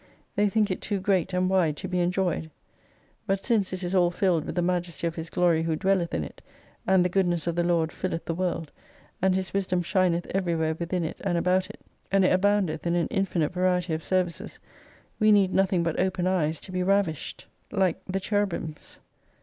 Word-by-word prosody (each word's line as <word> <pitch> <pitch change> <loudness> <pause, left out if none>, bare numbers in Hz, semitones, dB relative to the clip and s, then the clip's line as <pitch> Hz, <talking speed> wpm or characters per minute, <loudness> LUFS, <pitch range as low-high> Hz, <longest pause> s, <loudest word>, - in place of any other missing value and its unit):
They 205 0 +3
think 210 -1 +1
it 185 - -3
too 205 -2 -2
great 190 -2 +1
and 180 0 +1
wide 175 -6 +2
to 185 - -5
be 180 -1 -1
enjoyed. 175 -2 0 0.8
But 195 0 -1
since 215 -6 +1
it 185 0 -4
is 175 +1 -2
all 180 -2 +4
filled 175 -3 +1
with - - -5
the 175 - +1
Majesty 175 -2 -1
of 165 - 0
His 165 0 -6
Glory 170 -2 +2
who 165 -1 0
dwelleth 190 0 +1
in 80 - -1
it; - - -10 0.5
and 185 -1 +4
the - - +4
Goodness 175 -2 0
of 170 -1 -1
the 175 - +1
Lord 170 -2 +1
filleth 175 -3 -4
the 165 - -2
"World, 170 -3 -2 0.5
and 190 0 +3
His 190 0 -2
wisdom 185 -2 0
shineth 175 -1 +1
everywhere 165 -4 0
within 170 +2 -2
it 160 - -5
and 180 -4 0
about 185 +2 +1
it; - - -12 0.3
and 195 -1 +4
it - - +4
aboundeth 195 -3 +1
in 170 - +1
an 170 -3 0
infinite 180 -5 0
variety 180 -2 +1
of 160 - -2
services; 180 -1 -2 0.6
we 215 -1 +5
need 195 -3 +4
nothing 190 -2 +2
but 165 -2 -1
open 185 -1 0
eyes, 165 -4 +1
to - - -10
be 185 0 -1
ravished 185 -4 0 0.3
like 190 -4 +1
the 190 +1 -1
Cherubims. 195 -6 -3
180 Hz, 205 wpm, -26 LUFS, 170-190 Hz, 0.8 s, we